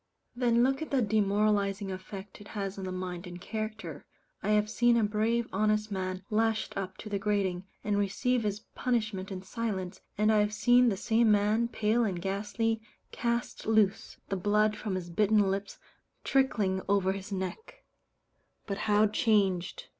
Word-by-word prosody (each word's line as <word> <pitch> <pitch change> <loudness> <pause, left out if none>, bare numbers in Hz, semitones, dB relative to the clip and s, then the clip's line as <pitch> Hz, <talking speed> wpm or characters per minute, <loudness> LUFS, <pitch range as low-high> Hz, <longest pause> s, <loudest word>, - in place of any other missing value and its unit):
Then 240 -1 +3
look 270 +3 +1
at 315 - -4
the 265 -3 +2
demoralizing 205 -1 +1
effect 190 +2 -8
it 205 - -11
has 195 -1 -3
on 190 - -4
the 185 - -4
mind 185 0 -5
and 175 0 -8
character. 215 -7 -5 0.4
I 200 - -2
have 210 0 +3
seen 240 +2 +3
a 230 - +3
brave 220 +3 +1
honest 215 +1 +1
man 185 -1 -3
lashed 220 0 +1
up 190 -1 -4
to - - -9
the 200 -1 -1
grating, 195 -3 0 0.2
and 205 -1 +1
receive 235 +5 +1
his 210 -1 -2
punishment 215 -6 -1
in 185 -1 -5
silence, 190 -3 -4 0.2
and 215 +1 +3
I 215 - +4
have 210 0 +1
seen 245 +2 +5
the 195 - -1
same 225 +2 +3
man, 210 +3 +3
pale 225 +1 +1
and 190 -5 -1
ghastly, 205 +4 -1 0.3
cast 235 -1 -2
loose 220 0 +2
the 195 - -1
blood 210 +3 +2
from 210 -3 -3
his 180 -2 -4
bitten 205 +1 +3
lips 195 +1 -4 0.5
trickling 210 -8 +1
over 195 -2 +3
his 195 +1 -6
neck 445 - -5 0.8
but 200 -1 -4
how 210 +1 +5
changed! 205 -4 +1
210 Hz, 170 wpm, -30 LUFS, 195-220 Hz, 0.8 s, seen